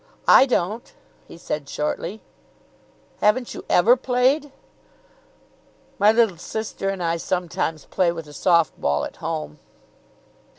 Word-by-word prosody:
"I 270 Hz, -, +7 dB
don't," 220 Hz, -1 st, -2 dB, 0.3 s
he -, -, -12 dB
said 150 Hz, -4 st, -5 dB
shortly. 170 Hz, +7 st, -3 dB, 1.0 s
"Haven't 230 Hz, +4 st, +1 dB
you -, -, -8 dB
ever 225 Hz, +8 st, +5 dB
played?" 260 Hz, +3 st, +1 dB, 1.5 s
"My 205 Hz, +2 st, +6 dB
little 225 Hz, -6 st, +2 dB
sister 205 Hz, +2 st, -4 dB
and 195 Hz, -2 st, -3 dB
I 165 Hz, 0 st, 0 dB
sometimes 165 Hz, -3 st, -3 dB
play 180 Hz, -2 st, +1 dB
with 165 Hz, -2 st, -7 dB
a 150 Hz, -, -13 dB
soft 170 Hz, -1 st, +2 dB
ball 70 Hz, 0 st, 0 dB
at -, -, -10 dB
home." 75 Hz, 0 st, -5 dB
185 Hz, 125 wpm, -22 LUFS, 165-230 Hz, 1.5 s, I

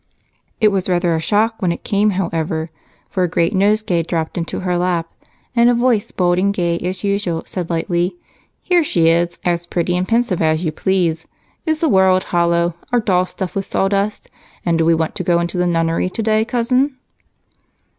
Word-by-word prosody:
It 215 Hz, -, +5 dB
was 195 Hz, -2 st, -1 dB
rather 175 Hz, -1 st, +1 dB
a -, -, 0 dB
shock 220 Hz, +7 st, 0 dB
when 180 Hz, -3 st, +1 dB
it 170 Hz, -, -5 dB
came, 210 Hz, 0 st, +2 dB
however, 165 Hz, -4 st, -2 dB, 0.4 s
for 190 Hz, -, -1 dB
a 180 Hz, -, +3 dB
great 170 Hz, +2 st, +1 dB
nosegay 200 Hz, -2 st, +2 dB
dropped 165 Hz, -1 st, -3 dB
into 170 Hz, -1 st, -3 dB
her 180 Hz, -1 st, -1 dB
lap 175 Hz, -2 st, 0 dB, 0.5 s
and 235 Hz, 0 st, +5 dB
a 245 Hz, -, +3 dB
voice, 240 Hz, -3 st, +1 dB
bold 175 Hz, -1 st, +1 dB
and 200 Hz, +2 st, +2 dB
gay 170 Hz, -3 st, -1 dB
as 185 Hz, +1 st, -4 dB
usual, 200 Hz, -5 st, -1 dB
said 180 Hz, -3 st, -5 dB
lightly: 175 Hz, +2 st, -1 dB, 0.5 s
"Here 355 Hz, -2 st, +3 dB
she 165 Hz, -, +2 dB
is, 170 Hz, +1 st, +1 dB
as 175 Hz, -1 st, 0 dB
pretty 175 Hz, 0 st, -1 dB
and 180 Hz, +1 st, -1 dB
pensive 230 Hz, -6 st, +1 dB
as 160 Hz, +2 st, +1 dB
you 155 Hz, -, 0 dB
please. 165 Hz, -1 st, 0 dB, 0.4 s
Is 315 Hz, -1 st, 0 dB
the 330 Hz, -, +3 dB
world 190 Hz, -5 st, +4 dB
hollow, 170 Hz, 0 st, +1 dB, 0.2 s
our 245 Hz, -, +3 dB
doll 185 Hz, -4 st, +1 dB
stuffed 185 Hz, -1 st, -5 dB
with 195 Hz, -1 st, -2 dB
sawdust, 200 Hz, +2 st, -1 dB, 0.4 s
and 170 Hz, -1 st, +2 dB
do 165 Hz, -, +2 dB
we 165 Hz, 0 st, +4 dB
want 160 Hz, -1 st, -1 dB
to -, -, -4 dB
go 170 Hz, 0 st, +2 dB
into 175 Hz, +1 st, -1 dB
a 180 Hz, -, +1 dB
nunnery 165 Hz, +1 st, 0 dB
today, 220 Hz, +2 st, 0 dB
Cousin?" 255 Hz, +3 st, 0 dB
180 Hz, 190 wpm, -18 LUFS, 170-205 Hz, 0.5 s, It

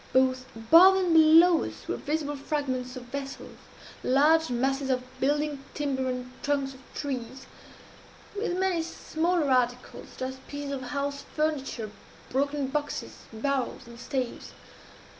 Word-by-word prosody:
Both 255 Hz, 0 st, +3 dB
above 330 Hz, +12 st, +7 dB
and 365 Hz, -3 st, +2 dB
below 325 Hz, +2 st, +7 dB
us -, -, -8 dB
were -, -, -1 dB
visible 295 Hz, -1 st, -2 dB
fragments 270 Hz, -3 st, -3 dB
of 255 Hz, -, -7 dB
vessels, 275 Hz, +2 st, -7 dB, 0.4 s
large 310 Hz, +5 st, +4 dB
masses 270 Hz, +3 st, 0 dB
of 255 Hz, -1 st, +1 dB, 0.2 s
building 290 Hz, 0 st, 0 dB
timber 265 Hz, -3 st, -1 dB
and 250 Hz, 0 st, -4 dB
trunks 280 Hz, -2 st, 0 dB
of 260 Hz, -, -14 dB, 0.2 s
trees, 260 Hz, -2 st, -5 dB, 0.9 s
with 400 Hz, -4 st, -1 dB
many 375 Hz, -3 st, +1 dB
smaller 325 Hz, -1 st, -1 dB
articles, 250 Hz, -1 st, 0 dB
such -, -, -4 dB
as 260 Hz, 0 st, -8 dB
pieces 285 Hz, -1 st, -5 dB
of 275 Hz, -2 st, -3 dB
house 280 Hz, +2 st, -3 dB
furniture, 275 Hz, -8 st, -1 dB, 0.4 s
broken 280 Hz, +2 st, 0 dB
boxes, 290 Hz, +2 st, -4 dB
barrels, 265 Hz, +3 st, -2 dB
and 235 Hz, 0 st, -12 dB
staves. 255 Hz, -2 st, -4 dB
280 Hz, 135 wpm, -28 LUFS, 255-305 Hz, 0.9 s, above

